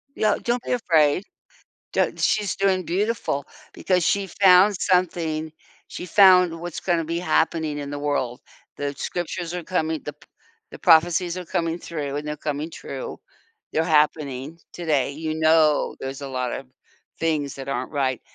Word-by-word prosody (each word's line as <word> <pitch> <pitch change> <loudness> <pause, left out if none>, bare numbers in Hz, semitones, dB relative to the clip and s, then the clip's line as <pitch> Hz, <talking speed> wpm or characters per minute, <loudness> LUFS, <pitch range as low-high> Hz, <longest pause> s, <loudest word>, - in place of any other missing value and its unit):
Yeah, 215 -1 +2
don't 240 0 -1
be - - -4
afraid. 165 -7 +3 0.7
D - - +1
she's 210 -2 +1
doing 190 -2 +1
beautiful, 195 -7 -1 0.3
because 180 -2 +1
she 200 -1 +1
found 190 +2 +5
something. 165 -4 0 0.4
She - - -7
found 180 -3 +5
what's 175 -1 -5
gonna 170 -3 0
be 170 +1 -2
happening 160 -3 0
in 140 - -5
the 145 - -4
world. 140 -4 -2 0.3
The 145 0 -3
scriptures 175 +2 -4
are 175 - -4
coming, 160 -4 -1
the 150 - -6
p 150 - -23 0.4
the - - -10
prophecies 170 +2 +4
are 180 - -6
coming 165 -1 -1
through, 145 -4 -4
and 150 +1 -5
they're 150 0 -4
coming 150 +1 -3
true. 485 - -7 0.5
They're 160 - +2
happening 150 -1 +1
today. 150 -6 0
You 155 +2 -4
know 155 -2 +3
there's 135 +1 -6
a 140 - -5
lotta 125 +1 -3 0.5
things 155 -4 -1
that 135 0 -8
aren't 130 0 -3
right, 130 -4 -1
160 Hz, 155 wpm, -23 LUFS, 145-180 Hz, 0.7 s, found